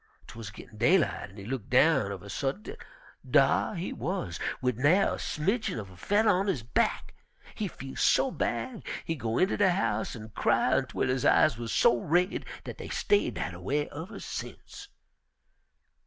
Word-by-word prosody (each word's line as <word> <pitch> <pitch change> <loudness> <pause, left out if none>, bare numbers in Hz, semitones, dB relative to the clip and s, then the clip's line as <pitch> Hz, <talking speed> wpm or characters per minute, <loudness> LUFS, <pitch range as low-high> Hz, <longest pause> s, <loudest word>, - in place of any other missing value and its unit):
'Twuz 110 -3 -8
gittin' 105 +1 -13
daylight, 165 - +2
an' 100 - -16
he 100 - -8
look 125 -2 -4
down 130 -4 +4
uv 100 -2 -6
a - - -10
suddint 140 - -3
an' - - -18
dar - - +4
he 175 +1 -4
wuz! 125 - -3 0.2
wid 125 -2 -1
nair' 165 +9 +4
a - - -5
smidgin' 195 - -1
uv 100 -4 -7
a - - -14
fedder 205 - +1
on 195 +2 +1
his 155 - -1
back. 215 - 0 0.4
He 215 - -3
feel 135 -6 -9
so 270 - +3
bad 250 -3 -3 0.2
he 165 - -1
go 115 -6 -2
inter 190 - +2
de 205 -2 +4
house 115 -10 0
an' 110 -1 -9
cry - - +2
ontwel - - 0
his 130 0 0
eyes 145 - +5
wuz 120 - -4
so 120 - +4
raid 175 - 0 0.2
dat - - -8
dey - - -7
stayed 410 - +1
dat - - -3
a - - -9
way 145 0 -1
uver 160 +8 -7
sence. - - -8
140 Hz, 185 wpm, -29 LUFS, 115-190 Hz, 0.4 s, eyes